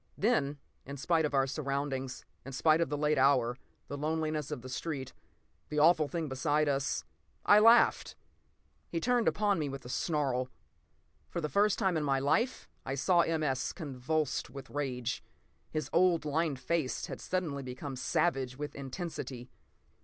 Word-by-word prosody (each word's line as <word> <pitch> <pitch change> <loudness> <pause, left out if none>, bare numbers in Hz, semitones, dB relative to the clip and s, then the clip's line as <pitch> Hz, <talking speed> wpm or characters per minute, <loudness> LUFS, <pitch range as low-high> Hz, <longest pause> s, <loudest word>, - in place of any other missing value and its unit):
Then, 150 - +1 0.3
in 140 +1 -7
spite 160 +3 +2
of 145 - -1
our 135 -1 +4
surroundings, 135 -2 -3 0.2
in 135 - -8
spite 155 +4 +3
of 165 - +1
the 145 - -1
late 150 -1 +2
hour, 130 -3 +4 0.3
the 145 - -5
loneliness 155 -1 -1
of 120 - -5
the - - -7
street, 135 0 -4 0.6
the 150 - -4
awful 155 0 +5
thing 165 0 -3
beside 145 +3 +1
us, 140 -1 0 0.4
I 205 - +7
laughed. 230 +2 +5 0.7
He 170 - -2
turned 245 +4 +2
upon 205 -3 +2
me 150 -2 -1
with 135 -1 -7
a - - -8
snarl. 130 -4 0 0.8
For - - -3
the 150 -2 -2
first 205 +7 +3
time 190 -6 +1
in 155 - -1
my 135 -2 +2
life 145 - +1 0.2
I 135 - -3
saw 175 +6 +3
M. 160 -2 0
S. 135 -3 -1
convulsed 150 -1 -2
with 140 -1 -10
rage. 130 -5 -3 0.5
His 155 -1 -3
old, 170 -2 +3
lined 150 -1 0
face 155 0 -1
had - - -7
suddenly 165 -7 -2
become 130 +2 -6
savage 135 -3 0
with 150 0 -5
intensity. 135 -3 -6
145 Hz, 165 wpm, -31 LUFS, 135-165 Hz, 0.8 s, I